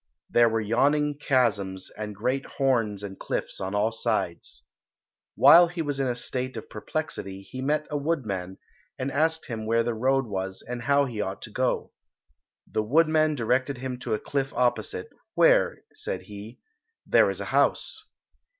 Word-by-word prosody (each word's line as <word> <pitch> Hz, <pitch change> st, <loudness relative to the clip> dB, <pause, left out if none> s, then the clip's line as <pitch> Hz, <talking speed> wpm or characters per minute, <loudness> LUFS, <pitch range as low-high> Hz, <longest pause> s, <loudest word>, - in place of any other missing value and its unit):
There 120 Hz, -1 st, +5 dB
were 115 Hz, 0 st, 0 dB
yawning 145 Hz, +7 st, +2 dB
chasms 100 Hz, -9 st, +1 dB
and 105 Hz, -1 st, -5 dB
great 125 Hz, +6 st, -1 dB
horns 115 Hz, -7 st, +1 dB
and 95 Hz, -1 st, -7 dB
cliffs -, -, -3 dB
on 95 Hz, +2 st, -3 dB
all 105 Hz, +2 st, +2 dB
sides. 110 Hz, -, -2 dB, 0.7 s
While 175 Hz, +1 st, +8 dB
he 170 Hz, -1 st, -4 dB
was 145 Hz, -2 st, -2 dB
in 135 Hz, -, +1 dB
a 125 Hz, -, 0 dB
state 130 Hz, +1 st, -3 dB
of -, -, -8 dB
perplexity 95 Hz, 0 st, -4 dB
he 130 Hz, +6 st, -8 dB
met 150 Hz, +3 st, 0 dB
a 150 Hz, -, 0 dB
woodman, 110 Hz, -, -2 dB, 0.4 s
and 130 Hz, +2 st, -2 dB
asked 160 Hz, +3 st, +1 dB
him 110 Hz, -3 st, -5 dB
where 115 Hz, +1 st, +3 dB
the 120 Hz, 0 st, -1 dB
road 135 Hz, +4 st, +1 dB
was 95 Hz, -3 st, -4 dB
and 120 Hz, 0 st, -4 dB
how 140 Hz, +3 st, +3 dB
he 115 Hz, -5 st, -4 dB
ought 95 Hz, -1 st, -4 dB
to -, -, -9 dB
go. -, -, -1 dB, 0.7 s
The -, -, -1 dB
woodman 155 Hz, +5 st, +3 dB
directed 130 Hz, +2 st, 0 dB
him 125 Hz, 0 st, -5 dB
to 120 Hz, -3 st, -1 dB
a -, -, -4 dB
cliff 140 Hz, -1 st, -2 dB
opposite, 120 Hz, -6 st, 0 dB, 0.2 s
"where," -, -, +4 dB
said -, -, -4 dB
he, 105 Hz, +3 st, -10 dB, 0.5 s
"there -, -, +5 dB
is -, -, -4 dB
a -, -, -4 dB
house." 435 Hz, -, +1 dB
120 Hz, 170 wpm, -26 LUFS, 105-140 Hz, 0.7 s, While